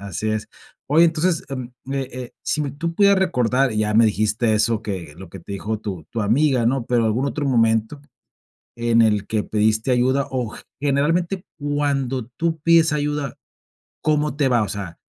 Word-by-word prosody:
así 100 +2 -4
es. 110 0 -3 0.4
Oye, 155 +4 +5
entonces, 165 +1 +1
em, 130 -2 -6
me 135 +1 -2
eh, 125 -1 -8
si 150 - 0
me 140 - -3
tú 165 +4 -4
pudieras 200 +1 +5
recordar, 130 -7 +1
ya 105 0 0
me 115 +1 +6
dijiste 110 +2 +1
eso, 110 +1 +1
que 90 -7 -5
lo 95 0 -10
que - - -10
te 100 - -9
dijo 105 +2 -3
tu 95 -7 -6
tu 115 - -3
amiga, 125 +3 +2
¿no? 125 -1 0
Pero 120 -2 +2
algún 115 +5 +1
otro 145 +3 -2
momento 115 +1 +1 0.8
en 115 0 +2
el 105 -2 +2
que 110 0 -1
pediste 110 +3 +1
ayuda, 130 +3 +2
o, 125 -4 -2
g - - -11 0.2
generalmente 165 +7 0 0.2
cuando 140 -4 -1
tú 165 -1 -1
pides 165 -1 +4
ayuda, 145 -2 -2 0.7
¿cómo 150 -1 +1
te 140 -3 +2
va? 120 -3 +3
O 105 - -2
sea, 95 -5 -6
125 Hz, 185 wpm, -21 LUFS, 110-145 Hz, 0.8 s, me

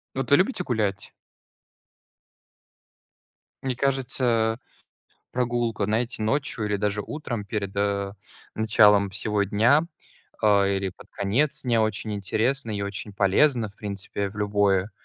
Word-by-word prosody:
Вот 135 - -2
вы 145 - +8
любите 185 0 +1
гулять? 105 - -2 2.5
Мне 130 -2 -1
кажется, 120 -4 0 0.7
прогулка, 120 -4 -1
знаете, 115 +3 -1
ночью 115 -1 -1
или 105 0 0
даже 105 +1 -1
утром 120 -6 -5
перед, 100 -1 -4
э, 100 -1 0 0.4
началом 105 -2 +4
всего 100 +1 0
дня, 115 - +3 0.6
э, - - +3 0.3
или 95 -1 -2
под 90 - -17
конец 145 +10 0
дня 120 -3 +2
очень 110 0 -2
интересно 115 +5 -1
и 100 -1 -2
очень 100 +1 -5
полезно, 110 +5 +3
в 100 - -19
принципе, 100 -1 -4
в 105 - -14
любое 100 -1 +1
110 Hz, 125 wpm, -25 LUFS, 100-120 Hz, 2.5 s, вы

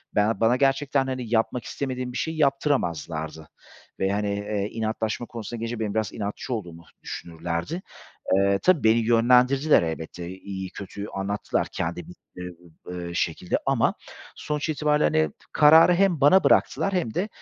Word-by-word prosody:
ben 105 +2 +2
bana 115 +2 +4
gerçekten, 135 0 +1
hani, 125 -3 -4
yapmak 115 +2 +1
istemediğim 130 +2 -4
bir 125 - -5
şeyi 160 0 -3
yaptıramazlardı 85 - -1 0.5
ve 95 +1 +1
hani, 105 0 -1
eee, 100 0 -2
inatlaşma 110 +1 -2
konusuna 120 0 -7
gelince 115 0 -4
benim 105 -2 -2
biraz 110 -3 -1
inatçı 105 +4 -4
olduğumu 85 -7 -6 0.2
düşünürlerdi. 85 - -4 0.6
Eee, 100 0 +3
tabii 180 -9 +3
beni 110 +1 +5
yönlendirdiler 125 - +4
elbette. 80 +1 -5
İyiyi, 95 0 -7
kötüyü 100 +1 -7
anlattılar 100 +1 -2
kendi 85 +1 -3
bildikleri, 90 0 -11 0.5
eee, 85 - -7
şekilde. 85 +1 -1
Ama - - +2 0.4
sonuç 150 +1 -3
itibariyle, 150 0 +1
hani, 80 -2 +2 0.2
kararı 160 +4 +7
hem 180 -4 +2
bana 165 +7 +6
bıraktılar 195 - +3
hem 165 -12 -1
de, 195 +4 -1
110 Hz, 145 wpm, -25 LUFS, 95-135 Hz, 0.6 s, kararı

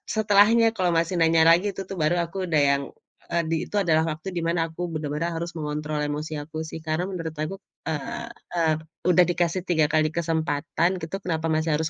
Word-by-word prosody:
setelahnya 220 +2 +5
kalau 180 -2 +2
masih 170 +2 +1
nanya 165 0 +5
lagi 180 +5 +4
tuh 195 - -4
tuh 195 - -5
baru 155 +3 +3
aku 185 +2 -4
udah 155 -3 +3
yang, 140 0 +2 0.5
eee, 170 0 +1
di 165 - +1
itu - - -6
adalah 160 -3 +3
waktu 155 +5 -6
di - - 0
mana 170 +1 +1
aku 160 - -8
bener-bener 150 +2 -2
harus 170 +1 -4
mengontrol 150 0 -3
emosi 150 +2 -3
aku 155 +1 -9
sih 160 - -6
karena 155 +3 0
menurut 165 -4 -4
aku, 155 +5 -3 0.3
eee 160 +10 -4 0.3
eee, 165 -2 +3 0.4
udah 180 0 +6
dikasih 175 +1 0
3 160 -3 +3
kali 155 0 +3
kesempatan 160 0 0
gitu 160 +4 -4
kenapa 165 -2 -1
masih 160 +1 +1
harus 160 +1 -1
165 Hz, 195 wpm, -25 LUFS, 155-175 Hz, 0.5 s, udah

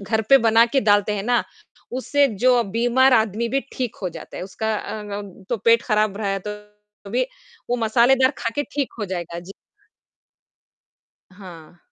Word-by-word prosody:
घर 220 +3 -1
पे 275 - +9
बना 225 +1 +6
के 270 +3 +1
डालते 205 -1 +3
हैं 195 - -3
ना, 240 +2 +1 0.5
उससे 280 +3 +2 0.2
जो 250 -2 +5
बीमार 245 +3 +3
आदमी 220 +1 +1
भी 270 +3 0
ठीक 250 -4 -4
हो 185 - -1
जाता 170 - -10
है, - - -5
उसका 220 +3 -3
अ, - - -6 0.3
अम, 200 -1 -10
तो 240 - 0
पेट 230 +3 +3
ख़राब 215 -3 +1
रह 200 -2 -1
तो 210 0 -12
भी 245 +4 +1 0.5
वो 245 - +2
मसालेदार 245 +4 +3
खाकर 230 +5 -2
ठीक 285 -2 -1
हो 210 - -2
जाएगा, 175 -3 -5
जी। 180 +3 -11 1.8
हाँ। 175 -4 -13
220 Hz, 165 wpm, -22 LUFS, 200-245 Hz, 1.8 s, पे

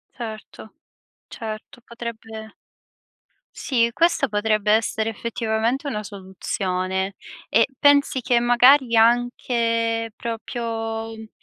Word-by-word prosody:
Certo, 220 -2 -9 0.5
certo. 220 +2 -8
Potrebbe 225 -2 -8 1.0
Sì, 235 -4 +1
questa 335 +7 +2
potrebbe 210 0 +1
essere 220 0 +1
effettivamente 230 +4 -2
una 210 -5 -3
soluzione, 190 -1 -3 0.3
e 230 - +4
pensi 285 -1 +4
che 245 -1 +2
magari 245 +1 +5
anche 230 -1 +1
proprio, 225 -1 -4
uhm, 220 -1 -11
225 Hz, 90 wpm, -22 LUFS, 220-240 Hz, 1.0 s, magari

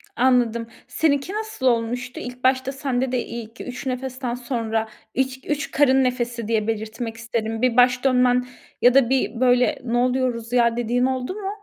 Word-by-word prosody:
Anladım. 240 -2 +2 0.2
Seninki 295 +3 0
nasıl 435 -10 -4
olmuştu? 245 +1 0
İlk 250 0 -8
başta 260 0 +2
sende 265 -2 -2
de 250 -2 -1
ilk 230 0 -8
3 250 +2 -7
nefesten 255 -1 -3
sonra, 230 -3 -2 0.3
ilk 265 +1 -2
3 295 -1 -2
karın 265 -2 +4
nefesi 240 -3 -2
diye 220 -1 0
belirtmek 225 +1 -4
isterim, 225 -1 -3
bir 255 -2 +2
baş 250 0 +5
dönmen 250 -1 +3 0.3
ya 245 0 +6
da 265 -3 +4
bir 250 -4 0
böyle 250 -1 +3
"Ne 240 -1 -1
oluyoruz 245 -2 0
ya?" 235 -1 +3
dediğin 240 +1 +1
oldu 260 +4 -2
mu? 395 -2 -4
250 Hz, 165 wpm, -23 LUFS, 235-260 Hz, 0.3 s, ya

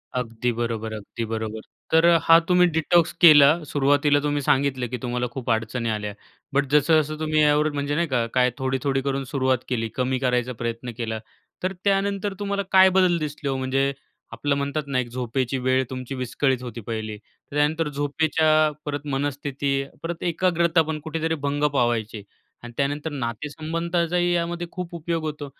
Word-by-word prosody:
अगदी 120 -1 -1
बरोबर, 115 -1 -3
अगदी 110 +2 -6
बरोबर. 110 0 -4 0.3
तर 160 +1 +5 0.2
हा 165 0 +7
तुम्ही 180 -1 +5
डिटॉक्स 170 +1 +2
केला 150 -4 +9 0.2
सुरुवातीला 145 0 +2
तुम्ही 145 0 -1
सांगितलं 135 -3 +1
की 125 - -3
तुम्हाला 125 0 -2
खूप 125 -2 -6
अडचणी 115 +1 -1
आल्या. 105 -1 -3 0.4
बट 140 +1 +2
जसं-जसं 155 +1 +3
तुम्ही 155 -1 +1
यावर 150 +1 +3
म्हणजे 145 0 -2
नाही 170 +1 +1
का 125 -4 0
काय 125 0 +3
थोडी-थोडी 135 0 -1
करून 135 0 -2
सुरुवात 130 -1 +1
केली. 115 -3 -1
कमी 130 0 0
करायचा 125 -1 0
प्रयत्न 115 +1 -3
केला. 110 -2 -3 0.4
तर 185 +1 0
त्यानंतर 200 0 0
तुम्हाला 200 -1 -1
काय 190 0 +7
बदल 180 -2 +4
दिसले 150 -1 -4
हो? 135 - -1
म्हणजे 135 +1 0 0.4
आपलं 145 -1 -1
म्हणतात 140 +2 -2
ना 135 -2 0
एक 125 - -2
झोपेची 125 +1 -2
वेळ 130 +1 +1
तुमची 130 +1 -6
विस्कळीत 130 +1 -1
होती 120 -2 -7
पहिली. 110 -2 -4
तर 110 +6 -17
त्यानंतर 150 +2 +1
झोपेच्या 150 +2 0 0.4
परत 145 0 -4
मनस्थिती 140 0 -2 0.3
परत 165 0 -4
एकाग्रता 170 -1 +2
पण 155 -1 -3
कुठेतरी 160 +1 -2
भंग 145 +1 -1
पावायची 115 -4 0 0.4
आणि 120 0 -9
त्यानंतर 145 +3 -1
नातेसंबंधाचाही 165 +7 -2
यामध्ये 175 0 -2
खूप 180 -1 -6
उपयोग 165 0 -3
होतो 150 -1 -4
140 Hz, 160 wpm, -24 LUFS, 125-160 Hz, 0.4 s, केला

